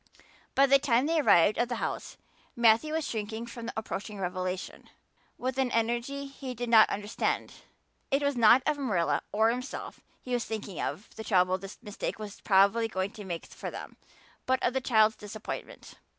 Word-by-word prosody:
By 275 - +6
the 275 0 +5
time 260 -2 +2
they 325 +1 +2
arrived 205 - +5
at 240 - +1
the 245 - -1
house - - -4 0.4
Matthew 235 +6 +4
was 320 -1 -1
shrinking 220 +1 -4
from 235 -1 -8
the - - -5
approaching 210 -1 -5
revelation 185 0 -4 0.5
with 260 +1 -3
an 260 -2 +2
energy 240 +5 -1
he 275 -2 -7
did 240 0 -4
not 225 -2 +7
understand. 205 +2 -2 0.6
It 275 +1 +1
was 285 -1 +1
not 240 +2 +6
of 300 -1 0
Marilla 170 - +1
or 220 +2 +3
himself 250 +3 -6 0.2
he 250 - -6
was 240 -1 +1
thinking 215 -4 -5
or - - 0
of 210 - -8
the 220 - -5
trouble 185 -3 +2
this 195 +1 -9
mistake 210 -2 -4
was 210 -2 -8
probably 200 +3 +4
going 190 -2 -2
to 210 - -10
make 175 -3 -5
for - - -7
them, - - -8 0.5
but 260 0 +3
of 245 - +2
the 265 - 0
child's 220 -3 +3
disappointment. 210 +1 -8
225 Hz, 185 wpm, -29 LUFS, 205-255 Hz, 0.6 s, not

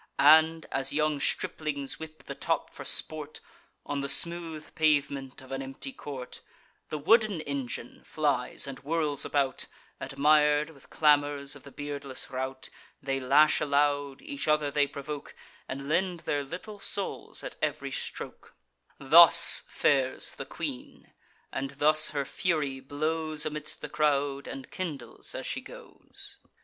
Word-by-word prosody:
And, 160 +3 +6
as 135 0 0
young 150 0 +1
striplings 145 -1 -1
whip 155 0 -10
the - - -6
top - - -2
for - - -8
sport, 155 -1 -2 0.5
On 145 -1 -2
the 140 - -3
smooth 165 0 +1
pavement 140 -4 0
of 130 - -14
an 135 0 -3
empty 135 - -6
court; 140 - -8 0.5
The 155 - -3
wooden 210 +4 +3
engine 135 -5 -5
flies 145 -5 -1
and 135 -1 -7
whirls 150 -1 -1
about, 140 -2 0 0.3
Admir'd, 150 +2 +3
with 140 -4 -19
clamours, 145 -2 +2
of 145 - -12
the 140 - -13
beardless 140 -2 -7
rout; 130 0 -4 0.3
They 135 -1 -2
lash 140 +4 +4
aloud; 145 -1 +1
each 280 - -4
other 150 -1 +2
they 145 0 +2
provoke, 140 +1 -7 0.3
And 140 +1 -5
lend 175 +2 0
their 145 -1 -1
little 185 +8 -8
souls 195 0 -3
at - - -7
ev'ry - - -2
stroke: - - -6 0.4
Thus 165 +4 +8
fares 135 -2 +1
the - - -7
queen; 60 - -7 0.4
and 135 0 -3
thus 155 +1 +5
her 140 -2 -2
fury 150 -7 -1
blows 155 +3 -2
Amidst 150 0 -5
the - - -5
crowd, 145 -2 0
and 135 -1 -8
kindles 155 -9 -5
as - - -5
she - - -3
goes. - - -11
145 Hz, 140 wpm, -29 LUFS, 140-155 Hz, 0.5 s, Thus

